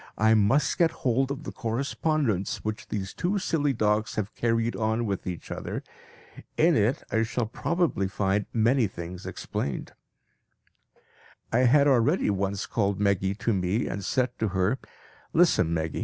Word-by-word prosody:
I 110 +1 +4
must 115 +7 +3
get 170 -2 +5 0.2
hold 130 +2 +2
of 140 +2 -4
the - - -5
correspondence 130 - -1
which 110 0 -4
these 100 -2 -4
two 190 +4 -1
silly 155 -6 +1
dogs 105 -3 0
have 105 0 -3
carried 115 0 0
on 110 +1 0
with 100 -3 -3
each 90 -2 -6
other. - - -4 0.7
In 165 +1 +4
it 110 +5 +1
I 110 - +2
shall 115 +1 -1
probably 165 - 0
find 95 +1 0
many 115 +1 +3
things 90 0 -8
explained." 70 - -4 1.6
I 125 +3 +4
had 145 +2 +5
already 135 - +3
once 100 0 -1
called 100 -3 0
Meggy 100 -1 +1
to 115 - 0
me 95 +4 0
and 100 - -4
said 125 +4 +1
to 110 - +1
her, 100 +8 +1 0.5
"Listen, 160 - +4
Meggy! 80 -2 -2
110 Hz, 155 wpm, -27 LUFS, 100-135 Hz, 1.6 s, get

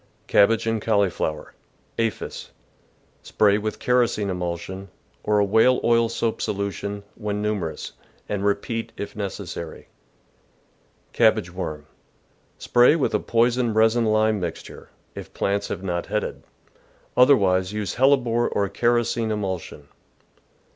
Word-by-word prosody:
Cabbage 110 +3 +3
and 115 -1 -1
Cauliflower. 100 -8 -1 0.2
— - - -17
Aphis. 115 -1 -3 0.4
— - - -38
Spray 105 -1 +3
with 110 0 -4
kerosene 120 -5 +1
emulsion, 90 +2 -5 0.3
or 105 0 +2
a 100 - +4
whale 110 +5 +4
oil 115 -1 +3
soap 115 -1 -2
solu 100 0 -2
tion, 100 +1 -6
when 105 -2 -4
numerous, 105 -6 -3 0.4
and 100 -1 -3
repeat 100 +3 -1
if 100 - -6
necessary. 95 -5 -6 1.2
Cabbage 90 0 +2
Worm. 75 -5 -5 0.4
— - - -39
Spray 120 +5 +5
with 160 - 0
a - - +2
poisoned 120 0 +1
resin 110 +1 +3
lime 110 -1 +2
mixture, 85 -3 -7 0.2
if - - -10
plants 100 +1 -1
have 95 - -5
not 85 -2 -3
headed; 105 +1 -3 0.7
otherwise 95 -8 +4
use 105 -3 -3
hellebore 125 -3 +2
or 100 -1 -1
kerosene 120 +1 +1
emulsion. 95 -8 -4
105 Hz, 125 wpm, -23 LUFS, 95-115 Hz, 1.2 s, Spray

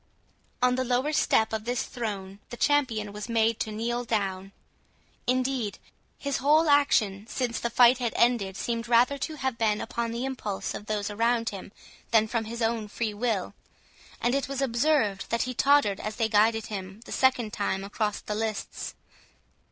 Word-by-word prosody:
On 250 0 +5
the 255 +1 0
lower 255 +4 0
step 220 -6 +2
of 220 0 -3
this 245 +1 -1
throne 200 -5 -5
the 240 - -7
champion 235 -9 +1
was 210 +3 -6
made 225 -1 +2
to 215 - -2
kneel 235 +3 -2
down. 195 -4 -2 0.8
Indeed 255 -3 0 0.4
his 280 -1 -2
whole 305 +3 +4
action 220 -8 +3
since 240 -2 -2
the 235 - -1
fight 245 +1 +5
had 240 -2 -1
ended, 215 -6 +2
seemed 230 0 -2
rather 245 +4 +4
to 310 +4 -3
have 265 -5 -3
been 215 -2 +2
upon 235 0 -3
the 235 +3 -3
impulse 230 -7 -4
of 210 - -8
those 210 -1 -2
around 230 +2 +1
him 195 -1 -8 0.4
than 220 -1 +4
from 225 0 -1
his 235 +2 -4
own 225 -1 0
free 215 +1 -3
will; 205 -3 -1 0.7
and 240 - +1
it 275 -1 0
was 275 -1 -4
observed 240 -6 +1
that 230 - +1
he 255 - -4
tottered 275 -6 +3
as 215 0 -4
they 225 -2 +1
guided 220 +1 +3
him 195 0 -7
the - - -11
second 245 -5 +2
time 195 -2 -1
across 210 +1 -2
the 210 - -4
lists. 220 0 -4
230 Hz, 175 wpm, -27 LUFS, 210-250 Hz, 0.8 s, On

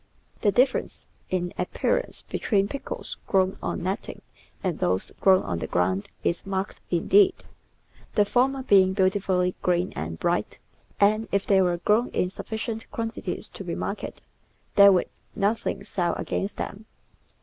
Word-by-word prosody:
The 205 - +4
difference 255 +4 +1 0.2
in 175 -1 -1
appearance 180 - -1
be - - -5
tween 200 -3 +2
pickles 280 +5 -6
grown 190 -1 +2
on 180 - -3
netting 190 +4 -4 0.4
and 180 -5 -1
those 90 +1 0
grown 190 -1 +5
on 90 -3 -3
the 80 - -4
ground 95 +4 0
is 170 - 0
marked 195 0 -3
indeed, 380 - +4 0.8
the 205 - +5
former 260 +5 +1
being 190 -5 +5
beautifully 185 -2 +1
green 180 0 +1
and 80 +2 -4
bright, - - 0 0.4
and 215 +2 +3
if 200 0 +1
they 195 -1 +4
were 175 -2 +2
grown 210 +7 +2
in 180 - 0
sufficient 220 +2 -5
quantities 225 0 -4
to - - -9
be - - -4
marketed, - - -5 0.5
there 200 0 +8
would 180 -2 +2 0.3
nothing 200 -1 0
sell 175 -4 -1
against 195 - -3
them. 215 +2 -6
195 Hz, 150 wpm, -26 LUFS, 180-215 Hz, 0.8 s, there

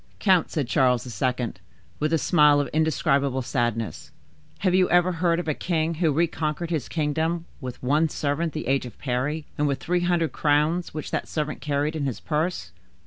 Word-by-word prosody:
"Count," 185 -5 +3
said 145 -6 -2
Charles 125 -3 +2 0.2
II., 125 -2 0 0.5
with 150 +1 0
a 165 - +4
smile 150 -2 +4
of 145 - 0
indescribable 140 -4 +1
sadness, 120 -3 -2 0.5
"have 185 -3 +2
you 185 0 +4
ever 175 +1 +4
heard 170 0 +1
of 175 - -4
a 155 - +1
king 165 0 -1
who 165 -1 +1
reconquered 160 +1 -1
his 155 -7 -2
kingdom 160 +2 -1
with 125 -3 -7
one 150 +5 +2
servant 150 +3 -1
the 155 - -4
age 135 -1 +1
of 120 - -13
Parry, 140 +4 -2
and 150 - +2
with 140 -1 -1
three 175 +1 0
hundred 175 -2 +1
crowns 155 +4 +1
which 155 - -6
that - - -2
servant 150 -1 -3
carried 145 +1 -1
in 150 -3 -2
his 130 - -4
purse?" 155 - -2
155 Hz, 185 wpm, -25 LUFS, 140-165 Hz, 0.5 s, a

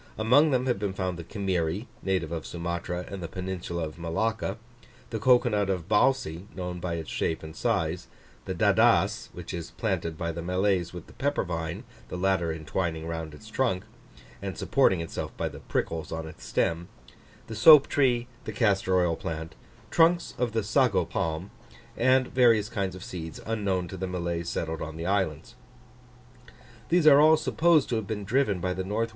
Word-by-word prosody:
Among 125 +8 +5
them 130 -2 +1
have 125 -6 0
been 100 -2 -2
found 95 -3 -3
the - - -5
Kimiri, 95 +1 -2
native 95 -4 -1
of 80 -2 -4
Sumatra 85 +1 -4
and 100 -1 -7
the 85 - -4
peninsula 90 -2 -4
of 75 +2 -9
Malacca; 100 +5 -1 0.5
the 110 - -2
cocoa 125 +2 +4
nut 105 -3 0
of 90 -4 -2
Balci, 105 -6 +1
known 90 -1 -4
by 85 -1 -3
its 80 -2 -6
shape 80 - -1
and 80 0 -9
size; 80 +2 -1 0.4
the - - -3
Dadass, - - +3
which - - -8
is 85 -1 -5
planted 85 -7 -2
by 85 0 -2
the 85 +1 -5
Malays 90 0 0
with 90 -2 -8
the - - -16
pepper 145 +1 0
vine, 80 -3 -4 0.3
the - - -4
latter 95 -3 +1
intwining 80 +1 -3
round 80 -2 -5
its 110 - -14
trunk, 110 -5 0 0.6
and - - -5
supporting 90 -3 +2
itself 80 - -5
by - - -1
the - - -8
prickles 80 -1 -3
on 80 0 -4
its - - -11
stem; 85 +1 0 0.6
the - - -8
soap 140 +6 +8
tree; 125 -4 +2 0.2
the - - -4
castor 95 -4 +2
oil 85 -2 +2
plant; 80 0 -5 0.4
trunks 170 +1 +3
of 120 -2 0
the 110 -1 0
sago 120 +1 +2
palm; 80 +4 -3 0.4
and 130 +1 +3
various 115 -4 +4
kinds 100 -5 -2
of 95 - -9
seeds 80 -3 -7
unknown 100 -5 -1
to 95 - -7
the 95 +1 -3
Malays 85 -2 -3
settled 80 -1 -3
on 80 0 -6
the 85 - -5
islands. 95 -5 -1 1.4
These 175 -1 +3
are 145 -1 +8
all 155 +1 +7
supposed 160 -1 +3
to 115 - 0
have 110 -3 -4
been 105 -1 -3
driven 110 -3 +1
by 90 +1 -1
the 95 - -3
N. 95 - -6
W. 115 +2 0
95 Hz, 185 wpm, -27 LUFS, 85-110 Hz, 1.4 s, soap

